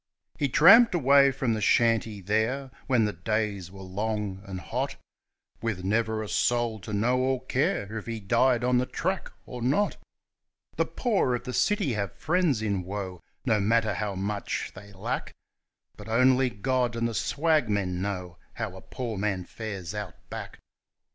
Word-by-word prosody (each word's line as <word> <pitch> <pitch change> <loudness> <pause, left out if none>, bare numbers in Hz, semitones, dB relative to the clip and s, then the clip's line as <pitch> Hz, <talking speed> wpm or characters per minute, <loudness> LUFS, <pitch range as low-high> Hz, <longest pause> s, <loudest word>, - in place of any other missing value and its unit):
He 140 - +1
tramped 195 - +7
away 140 -2 +6
from 130 -3 0
the 110 - -2
shanty 115 -1 +2
there, 110 +7 0 0.2
when 125 -5 +3
the 105 - -1
days 100 0 -2
were 95 +1 -11
long 100 0 -3
and 95 -1 -5
hot, 75 - -3 0.7
With 110 -6 -2
never 110 +2 0
a - - -6
soul 120 +3 +1
to 95 - -8
know 120 +5 +2
or 130 0 0
care 110 -6 0
if 110 - -13
he 115 -1 -3
died 120 +4 +2
on 125 0 +3
the 125 - -1
track 185 +2 -2
or 125 -1 -7
not. 145 - +1 0.8
The - - +1
poor 200 - +1
of 120 - -5
the 125 - -5
city 205 - +1
have 100 -4 -3
friends 155 -7 +1
in 100 -3 0
woe, 95 -2 -5 0.2
no 115 -4 +3
matter 110 +2 +2
how 105 -2 -3
much 100 +2 -3
they 100 +2 -12
lack, 95 -1 -4 0.6
But - - -10
only 130 +2 +4
God 125 +2 0
and 115 0 0
the 115 - -4
swagmen 105 - +1
know 90 -4 -4
how - - -4
a - - -10
poor 115 -6 -5
man 95 -3 -1
fares 100 -6 -6
Out 105 -4 -5 0.2
Back. - - -7
110 Hz, 165 wpm, -27 LUFS, 100-130 Hz, 0.8 s, tramped